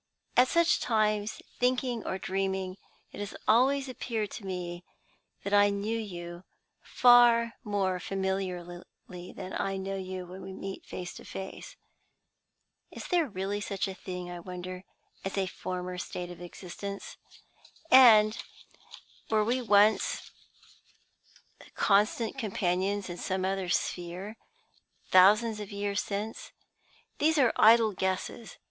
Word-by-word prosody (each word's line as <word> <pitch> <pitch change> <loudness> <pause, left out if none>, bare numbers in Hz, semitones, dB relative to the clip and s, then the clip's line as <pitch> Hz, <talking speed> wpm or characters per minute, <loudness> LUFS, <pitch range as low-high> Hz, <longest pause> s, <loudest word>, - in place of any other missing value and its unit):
At 250 +1 +6
such 335 +4 +3
times, 215 -2 0 0.2
thinking 250 -2 0
or 190 - -2
dreaming, 190 -1 -2 0.3
it - - -10
has 205 -1 -5
always 265 +5 +4
appeared 230 -4 -3
to 205 - -8
me 175 -1 -5 0.6
that 200 - -3
I 205 0 +6
knew 200 +3 -2
you 175 -4 -7 0.4
far 240 -1 +5
more 195 -4 0
familiarly 185 -2 -3 0.5
than 185 - -8
I 195 0 -1
know 195 +1 -4
you 185 -1 -5
when 185 +2 -10
we 190 - -8
meet 195 0 -7
face 180 -1 -6
to - - -11
face. 190 - -8 1.1
Is - - -9
there 345 -4 +2
really 200 -1 -3
such 195 0 -2
a 190 - -5
thing, 180 -1 -7
I 175 - -6
wonder, 180 +1 -7 0.4
as 195 +1 -4
a 195 - +2
former 180 -1 -5
state 180 0 -5
of 175 - -11
existence? 190 +3 -8 0.7
And 220 -4 +8 0.9
were 215 -1 +3
we 245 +4 0
once 210 -1 +3 1.4
constant 215 +5 +2
companions 195 -2 -1
in 175 -1 -6
some 185 +1 -2
other 190 -1 -2
sphere, 180 +5 -2 0.8
thousands 210 +4 +6
of 210 -1 -7
years 200 0 -1
since? 210 +2 -5 0.7
These 315 +2 +3
are 255 -5 +4
idle 225 -1 +6
guesses. 190 +3 -3
200 Hz, 130 wpm, -29 LUFS, 185-220 Hz, 1.4 s, And